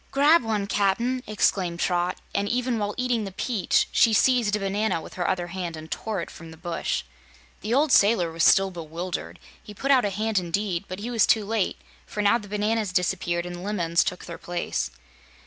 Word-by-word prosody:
"Grab 290 +5 +5
one, 220 -3 -1
Cap'n!" 215 +6 +1
exclaimed 185 -5 0
Trot, 175 0 0 0.2
and 200 0 0
even 245 0 0
while 205 0 -2
eating 250 -3 0
the 195 - -5
peach 210 +2 +1
she 230 - +4
seized 235 -2 +3
a - - -2
banana 195 -1 0
with - - -11
her 175 -2 -1
other 180 -2 -1
hand 175 -2 -5
and 155 0 -10
tore 215 -5 -3
it - - -7
from 165 - -11
the 160 - -12
bush. 175 0 -2 0.6
The 225 +3 -1
old 295 +1 +3
sailor 200 -6 +4
was 165 0 -1
still 195 0 +5
bewildered. 170 +1 -5 0.2
He 210 - -12
put 275 +7 0
out 260 -2 +5
a 205 - +1
hand 215 +1 0
indeed, 180 +1 -2
but 185 - -6
he 225 +5 -5
was 230 -4 +3
too 220 -1 +3
late, 215 -2 -1 0.3
for 210 - -3
now 220 +4 +4
the 210 - -11
bananas 210 0 0
disappeared 175 -1 0
and 175 0 -6
lemons 175 -5 +1
took 180 - -4
their 170 - -8
place. 175 0 -3
200 Hz, 200 wpm, -25 LUFS, 175-220 Hz, 0.6 s, Grab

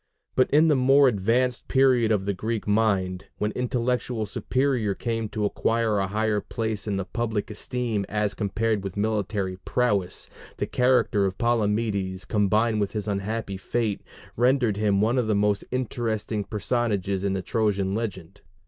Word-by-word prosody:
But 130 - +3
in 155 +3 +5
the 150 - +4
more 135 +2 +5
advanced 120 +3 +1
period 130 -4 +3
of 100 -3 +1
the 100 - 0
Greek 110 +3 -3
mind, 100 -3 +1
when 105 0 -1
intellectual 125 -1 -1
superiority 125 -2 0
came 115 -2 -1
to 105 -1 -2
acquire 115 0 +1
a 95 - 0
higher 105 +1 0
place 110 -1 -3
in 100 -2 -1
the 95 - -2
public 110 -1 -2
esteem 110 -2 -2
as 105 0 0
compared 105 0 -1
with 95 0 -6
military 100 -3 -1
prowess, 100 -3 -1 0.3
the - - -1
character 125 -5 +2
of 95 0 -5
Palamedes, 105 -5 0
combined 105 +2 +2
with 100 - -1
his 105 -1 -3
unhappy 100 0 -2
fate, 110 +1 -2 0.3
rendered 120 -3 +2
him 105 -2 +2
one 115 +4 +2
of 120 - 0
the 110 - +2
most 105 0 +1
interesting 115 -4 -2
personages 105 -3 -1
in 100 -1 0
the 95 -1 -2
Trojan 100 -4 0
legend. 100 -6 -5
110 Hz, 155 wpm, -25 LUFS, 100-120 Hz, 0.3 s, in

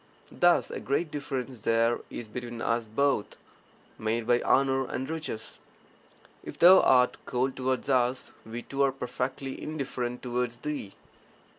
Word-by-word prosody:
Thus 175 -1 +3
a - - -4
great 150 +4 -1
difference 135 -4 -4
there 115 +2 +2
is 120 - -7
between 120 +1 -6
us 115 0 0
both, 110 0 0 0.6
made 110 +1 -1
by 120 +1 +3
honour 135 -1 +2
and 130 - -4
riches. 155 -8 -5 0.8
If - - -8
thou 185 +2 +9
art 125 -1 +4
cold 130 +1 0
towards 130 0 -1
us, 125 -1 +1
we 115 +2 -7
too 140 0 -3
are 135 -1 +4
perfectly 130 +1 -4
indifferent 130 -5 -4
towards 125 -1 -2
thee. 140 -7 -5
125 Hz, 140 wpm, -28 LUFS, 120-135 Hz, 0.8 s, thou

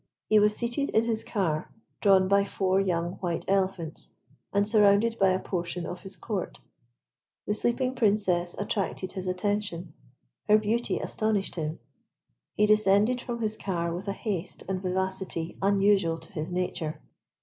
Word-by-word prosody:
He 215 - +6
was 210 0 +3
seated 240 +4 -1
in 220 - +3
his 225 -1 -1
car, 165 -8 -1 0.3
drawn 190 -2 +5
by 200 +1 +4
four 190 -1 +1
young 175 -2 -1
white 175 -3 -3
elephants, 190 -4 -1 0.4
and 200 0 +2
surrounded 215 +1 +4
by 195 -1 +5
a 185 0 +2
portion 175 -2 -3
of 180 0 -6
his 195 0 -10
Court. 205 -5 -4 0.9
The 210 - 0
sleeping 240 +4 0
Princess 200 -7 +1
attracted 195 -2 -2
his 185 -1 -5
attention. 185 -3 -2 0.6
Her 210 - +8
beauty 220 +3 0
astonished 215 -3 -1
him. 155 -1 -3 0.8
He 210 - +4
descended 215 +3 +4
from 235 -2 -5
his 215 0 -1
car 170 -5 -2
with 180 +4 -6
a 200 - 0
haste 195 -4 -4
and 185 -1 -2
vivacity 190 -2 -2
unusual 195 -4 +3
to 165 0 -14
his 155 0 -4
nature. 170 -4 -2
195 Hz, 150 wpm, -28 LUFS, 180-210 Hz, 0.9 s, Her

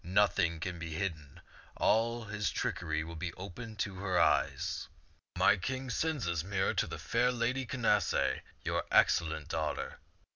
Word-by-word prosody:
Nothing 90 -2 +2
can 85 +1 -4
be 85 -1 -5
hidden. 80 -6 -4 0.4
All 115 +1 +2
his 105 -1 -2
trickery 80 -2 -1
will 85 +1 -7
be 85 +1 -4
open 110 +4 -8
to 100 -3 -8
her 95 -1 +1
eyes. - - +1 0.5
My - - +5
king 130 +6 -3
sends 155 -4 0
this 85 -2 0
mirror 95 0 0
to - - +1
the - - -5
fair 125 0 +2
Lady 125 +2 -1
Canacee, 105 -8 +2 0.2
your - - 0
excellent 80 -2 +3
daughter. 80 -3 -2
95 Hz, 150 wpm, -32 LUFS, 85-115 Hz, 0.5 s, My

